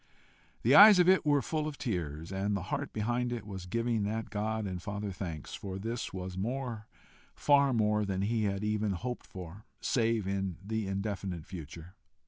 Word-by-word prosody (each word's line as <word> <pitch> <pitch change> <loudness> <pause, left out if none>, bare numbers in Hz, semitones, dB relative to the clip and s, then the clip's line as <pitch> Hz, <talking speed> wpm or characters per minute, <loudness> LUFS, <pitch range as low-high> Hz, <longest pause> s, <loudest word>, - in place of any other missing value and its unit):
The - - +4
eyes 205 -1 +11
of 180 -1 +5
it 185 -4 +4
were 145 -2 +4
full 155 -1 -1
of 150 -3 -5
tears, 80 - -3
and 100 +1 0
the 90 - -5
heart 140 0 -2
behind 120 +3 -1
it 120 -3 -4
was 95 -3 -7
giving 115 +2 0
that 110 +2 -2
God 110 +1 -1
and 90 -2 -4
Father 100 +2 -4
thanks, 85 -5 -6
for 95 -1 -5
this 115 +4 -4
was 95 0 -5
more, 120 0 -3 0.5
far 140 -1 +4
more 105 -2 +2
than 95 -1 -1
he 110 +1 +1
had 100 0 -1
even 105 -1 0
hoped 125 +7 -5
for, 95 +2 -9 0.2
save 115 -4 +1
in 95 -3 -2
the 110 -1 -2
indefinite 95 -4 -3
future. 85 0 -9
105 Hz, 180 wpm, -31 LUFS, 95-115 Hz, 0.5 s, eyes